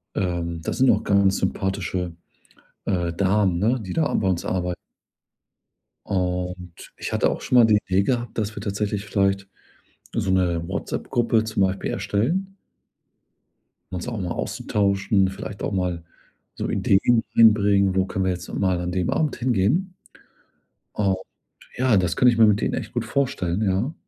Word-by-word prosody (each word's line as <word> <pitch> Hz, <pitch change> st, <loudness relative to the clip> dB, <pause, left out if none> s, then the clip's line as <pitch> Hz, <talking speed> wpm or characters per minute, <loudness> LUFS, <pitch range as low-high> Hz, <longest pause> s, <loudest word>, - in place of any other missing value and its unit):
ähm, 85 Hz, -2 st, -2 dB
da -, -, -3 dB
sind 130 Hz, 0 st, +3 dB
auch -, -, +3 dB
ganz 100 Hz, -1 st, +3 dB
sympathische, 95 Hz, -2 st, -2 dB, 0.7 s
äh, 85 Hz, -3 st, 0 dB
Damen, 95 Hz, 0 st, +1 dB
ne, 115 Hz, +7 st, +1 dB
die 95 Hz, -4 st, -6 dB
da 160 Hz, -, +1 dB
a -, -, -2 dB
bei 95 Hz, -, +1 dB
uns 90 Hz, -2 st, -1 dB
arbei 90 Hz, -1 st, -1 dB, 1.3 s
Und 90 Hz, -2 st, -3 dB
ich -, -, -5 dB
hatte -, -, +2 dB
auch -, -, -3 dB
schon 125 Hz, -, +2 dB
mal 115 Hz, -, +8 dB
die 110 Hz, -2 st, +5 dB
Idee 95 Hz, +1 st, +2 dB
gehabt, 120 Hz, +1 st, -2 dB
dass 110 Hz, 0 st, -2 dB
wir -, -, -6 dB
tatsächlich 100 Hz, 0 st, -2 dB
vielleicht 100 Hz, -1 st, 0 dB, 0.7 s
so 95 Hz, -, 0 dB
‘ne 90 Hz, -3 st, +1 dB
WhatsApp-Gruppe 115 Hz, +4 st, 0 dB
zum 110 Hz, -3 st, 0 dB
Beispiel 95 Hz, 0 st, -1 dB
erstellen 180 Hz, -, -1 dB, 1.4 s
um -, -, -4 dB
uns 90 Hz, -, -5 dB
auch 115 Hz, -3 st, -4 dB
mal 90 Hz, -2 st, -3 dB
auszutauschen, 100 Hz, -1 st, 0 dB
vielleicht 100 Hz, +1 st, -7 dB
auch -, -, -1 dB
mal 90 Hz, -3 st, -2 dB, 0.5 s
so -, -, -3 dB
Ideen 115 Hz, +4 st, +3 dB
einbringen: 100 Hz, -4 st, +5 dB
„Wo 95 Hz, 0 st, +2 dB
können 95 Hz, 0 st, -2 dB
wir 95 Hz, -, +2 dB
jetzt 90 Hz, 0 st, -5 dB
noch -, -, -5 dB
mal 95 Hz, -2 st, +1 dB
an 90 Hz, 0 st, -3 dB
dem 90 Hz, -2 st, -1 dB
Abend 155 Hz, -3 st, 0 dB
hingehen?“ 130 Hz, -, +1 dB, 1.0 s
Und 95 Hz, -2 st, +1 dB, 0.6 s
ja, 125 Hz, -3 st, +3 dB
das 90 Hz, -2 st, +1 dB
kann 125 Hz, -, +4 dB
ich 120 Hz, -2 st, +4 dB
mir 115 Hz, -, +7 dB
mit 105 Hz, 0 st, +3 dB
denen -, -, 0 dB
echt -, -, -4 dB
gut 120 Hz, -1 st, -2 dB
vorstellen, 110 Hz, -7 st, -1 dB
ja. 100 Hz, +9 st, 0 dB
100 Hz, 165 wpm, -23 LUFS, 90-110 Hz, 1.4 s, mal